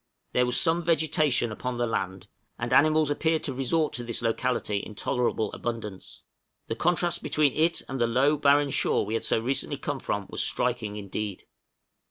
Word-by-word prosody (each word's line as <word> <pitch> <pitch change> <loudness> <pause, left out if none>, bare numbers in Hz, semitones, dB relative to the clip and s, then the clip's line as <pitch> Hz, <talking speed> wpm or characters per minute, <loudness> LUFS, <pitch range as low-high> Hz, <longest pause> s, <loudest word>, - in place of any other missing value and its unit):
There 125 0 +2
was 125 - +3
some 170 0 +3
vegetation 155 -7 +2
upon 125 +3 -4
the 120 - +1
land, 95 -4 -3 0.3
and 120 +1 -2
animals 155 +1 +4
appeared 160 +2 0
to 135 - -2
resort 150 +5 0
to 120 - -2
this 115 0 -4
locality 115 -2 0
in 105 +1 -6
tolerable 120 -3 -1
abundance; 110 -5 -6 0.4
the - - -3
contrast 175 0 +1
between 150 -3 +1
it 165 +2 +1
and 135 -2 -4
the 120 - +3
low, 130 +6 +3
barren 145 0 +3
shore - - +2
we 105 - -4
had 115 - -1
so - - +2
recently 135 +4 -1
come 145 0 -4
from 100 -4 -3
was - - -2
striking 120 -4 0
indeed! 100 -1 -5
125 Hz, 180 wpm, -27 LUFS, 115-150 Hz, 0.4 s, animals